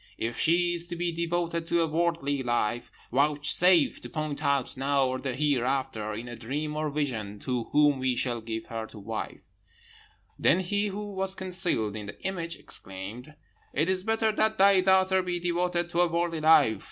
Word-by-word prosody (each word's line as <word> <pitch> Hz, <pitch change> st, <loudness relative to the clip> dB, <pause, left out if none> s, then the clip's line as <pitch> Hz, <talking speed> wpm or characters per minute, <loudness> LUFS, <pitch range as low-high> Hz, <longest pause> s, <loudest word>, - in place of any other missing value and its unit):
If 115 Hz, +1 st, -3 dB
she 175 Hz, +1 st, +3 dB
is 170 Hz, 0 st, -1 dB
to 175 Hz, -, -5 dB
be 175 Hz, 0 st, -1 dB
devoted 170 Hz, 0 st, -2 dB
to 170 Hz, 0 st, +2 dB
a -, -, 0 dB
worldly 160 Hz, -4 st, 0 dB
life, 120 Hz, -2 st, -1 dB, 0.2 s
vouchsafe 150 Hz, +5 st, +3 dB
to -, -, -8 dB
point 155 Hz, -3 st, -4 dB
out 140 Hz, -3 st, 0 dB
now 135 Hz, +1 st, +1 dB
or 130 Hz, 0 st, -2 dB
hereafter, 130 Hz, -5 st, -1 dB
in 115 Hz, +3 st, -6 dB
a 120 Hz, -, -7 dB
dream 145 Hz, +7 st, -4 dB
or 155 Hz, 0 st, -1 dB
vision, 120 Hz, -9 st, -3 dB
to 125 Hz, -3 st, -2 dB
whom 145 Hz, -2 st, +3 dB
we 130 Hz, -1 st, 0 dB
shall 120 Hz, -2 st, -1 dB
give 110 Hz, 0 st, -5 dB
her 115 Hz, -1 st, -5 dB
to 110 Hz, -, -14 dB
wife.' 110 Hz, +2 st, -6 dB, 0.9 s
"Then 185 Hz, -, +4 dB
he 205 Hz, +3 st, 0 dB
who 205 Hz, +1 st, -5 dB
was 190 Hz, 0 st, -2 dB
concealed 180 Hz, -, -1 dB
in 105 Hz, -1 st, -6 dB
the -, -, -9 dB
image 170 Hz, -3 st, -3 dB
exclaimed, 105 Hz, +10 st, -8 dB, 0.4 s
'It 155 Hz, +4 st, +2 dB
is 185 Hz, 0 st, 0 dB
better 220 Hz, +1 st, +1 dB
that 220 Hz, 0 st, +1 dB
thy 195 Hz, -1 st, +6 dB
daughter 190 Hz, 0 st, +4 dB
be 180 Hz, -1 st, -2 dB
devoted 175 Hz, 0 st, -1 dB
to 170 Hz, -, +2 dB
a 175 Hz, -, +4 dB
worldly 170 Hz, -1 st, -1 dB
life. 150 Hz, -9 st, +5 dB
155 Hz, 180 wpm, -28 LUFS, 125-175 Hz, 0.9 s, thy